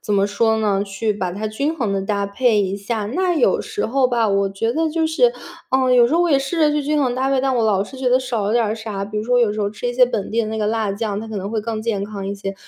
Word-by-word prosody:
怎 205 - -1
么 200 0 +3
说 220 +2 +1
呢， 200 -2 +1
去 210 +2 -2
把 185 -3 -3
它 210 +4 -4
均 280 +9 -2
衡 225 -8 -1
地 195 - 0
搭 200 0 -1
配 215 +1 +2
一 195 +1 -2
下。 210 +1 -3
那 355 - 0
有 - - +2
时 430 -1 -4
候 260 +2 +2
吧， 235 -3 +1
我 195 0 +1
觉 225 +4 -2
得 325 +2 0
就 320 +1 0
是， 475 +10 +3 0.4
嗯， 260 -1 +2
有 240 -1 +6
时 305 - 0
候 345 - +4
我 345 - +1
也 275 - +5
试 275 +5 -3
着 305 -1 +4
去 295 0 0
均 295 0 +1
衡 250 -2 0
搭 260 +1 0
配， 270 -1 +2
但 265 -1 0
我 230 - +2
老 200 -3 +2
是 260 +6 -10
觉 260 -1 0
得 255 +1 +4
少 240 -5 -2
了 210 - 0
点 225 -2 +1
啥。 210 -3 -5
比 210 +1 -4
如 215 - -3
说 245 +1 +2
有 215 -3 +2
时 215 - -4
候 200 - 0
吃 215 +4 -6
一 245 - -2
些 250 0 +5
本 205 -5 -3
地 230 +1 +1
的 215 - -3
那 220 - -4
个 210 -1 -1
辣 220 -2 0
酱， 205 -1 -3
它 225 - -7
可 220 -2 -6
能 195 +1 -4
会 220 -1 -1
更 220 0 -4
健 220 -3 -1
康 200 -2 -6
一 200 - -3
些， 195 0 -5
220 Hz, 340 characters per minute, -20 LUFS, 205-260 Hz, 0.4 s, 有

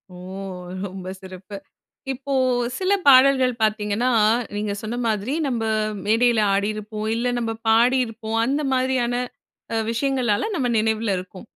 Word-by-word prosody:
ஓ! - - -10 0.7
ரொம்ப 185 -1 -7
சிறப்பு. 190 +1 -10 0.6
இப்போ, 275 +2 -5 0.5
சில 375 +1 0 0.2
பாடல்கள் 260 -1 +6
பார்த்தீங்கன்னா, 215 +3 +1 0.4
நீங்க 205 0 -2
சொன்னமாதிரி 225 0 -2
நம்ம 240 -4 -1 0.4
மேடைல 225 +1 +3
ஆடியிருப்போம், 215 +1 -3
இல்ல 235 +2 -1
நம்ம 230 -1 -2 0.2
பாடியிருப்போம். 225 -1 +2
அந்த 280 +4 0
மாதிரியான 255 -2 +1 0.6
அ - - +1
விஷயங்களால 240 - 0
நம்ம 265 -7 0
நினைவில 220 -1 +1
இருக்கும். 185 +2 -9
225 Hz, 115 wpm, -22 LUFS, 210-255 Hz, 0.7 s, பாடல்கள்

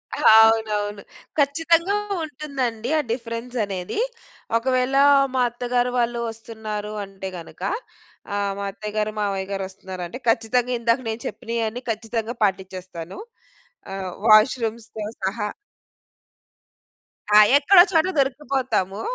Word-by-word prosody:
అవునవును. 220 -2 +4 0.4
ఖచ్చితంగా 330 +6 +2 0.3
ఉంటుందండి. 260 -6 -3
ఆ - - +2
డిఫరెన్స్ 230 +1 -5
అనేది. 190 - -4 0.6
ఒకవేళ 255 +2 0 0.4
మా 260 - +2
అత్తగారు 245 +1 -1
వాళ్ళు 235 0 0
వస్తున్నారు. 220 -2 -6
అంటే 195 -1 -7
గనుక 165 - -13 0.7
ఆహ్, 200 -1 -1
మా 200 - -4
అత్తయ్యగారు 210 +1 -3
మావయ్య 195 -2 -1
గారు 195 -1 -2
వస్తున్నారంటే 185 0 -7
ఖచ్చితంగా 230 +2 +2
ఇందాక 235 +2 +2
నేను 220 +1 -3
చెప్పినయన్నీ 230 +1 -3
ఖచ్చితంగా 225 +1 -2
పాటిచ్చేస్తాను. 185 -3 -3 0.8
ఆహ్, 190 -1 -4 0.2
వాష్‌రూమ్స్‌తో 220 -1 +3 0.2
సహా. 205 +2 -1 1.9
ఆ! - - +10 0.2
ఎక్కడో 355 +5 +7
చోట 325 0 +3
దొరికిపోతాము, 265 -8 0
225 Hz, 100 wpm, -23 LUFS, 205-250 Hz, 1.9 s, ఆ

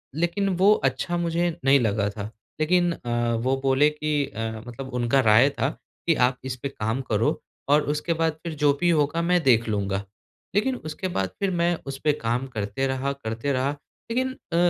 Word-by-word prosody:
लेकिन 175 +4 0
वो 200 +3 +6 0.2
अच्छा 175 -1 -3
मुझे 170 0 0 0.2
नहीं 140 +1 +6
लगा 105 -3 +1
था, 105 0 -6 0.3
लेकिन 175 +2 +3
अ, 120 -5 -1
वो 130 +3 +1
बोले 135 +2 +4
कि 150 0 -3
अ, 115 -3 -4 0.2
मतलब 130 +2 -8
उनका 125 +2 +2
राय 120 +6 +6
था, 135 - -1 0.4
कि 165 - +4
आप 125 0 +2
इस 130 -1 -3
पे 140 - -1
काम 110 0 -2
करो 115 -3 0 0.3
और 150 +1 +5
उसके 150 +3 0
बाद 160 -1 +1
फिर 165 -2 -4
जो 145 -1 +5
भी 175 +2 +2
होगा 155 +1 +2
मैं 180 +1 +2
देख 120 -3 +4
लूँगा। 100 -2 -1 0.5
लेकिन 255 +5 +2
उसके 155 -2 -5
बाद 95 - -1
फिर 195 -1 0
मैं 175 +1 +2
उस 135 - -4
पे 150 - +4
काम 125 -1 -2
करते 110 +2 -2
रहा 135 +1 -1
करते 115 0 -3
रहा, 130 +1 +1 0.4
लेकिन 260 +2 0 0.2
अ, - - +1
135 Hz, 190 wpm, -25 LUFS, 120-170 Hz, 0.5 s, वो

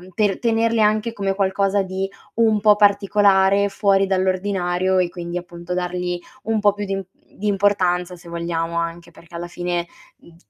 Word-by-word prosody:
per 205 -3 +1
tenerli 230 -1 +1
anche 215 +2 +2
come 195 -3 -2
qualcosa 195 0 +1
di 190 +1 -3 0.3
un 220 -2 +3
po' 210 -1 +6
particolare, 200 -1 +3
fuori 195 -1 +2
dall'ordinario 185 -1 0
e 180 -1 +2
quindi 175 0 -5
appunto 175 0 -7
dargli 180 0 -2 0.3
un 220 -1 0
po' 205 -1 +3
più 205 0 -5
di 195 - -3
imp 195 -1 -3 0.3
di 210 - -4
importanza 185 -3 +1
se 175 0 -14
vogliamo, 170 0 -3
anche 170 0 -4
perché 170 +1 -15
alla 175 +1 -5
fine, 175 0 -3 0.3
mhmm, 170 - -19
190 Hz, 165 wpm, -21 LUFS, 175-205 Hz, 0.3 s, po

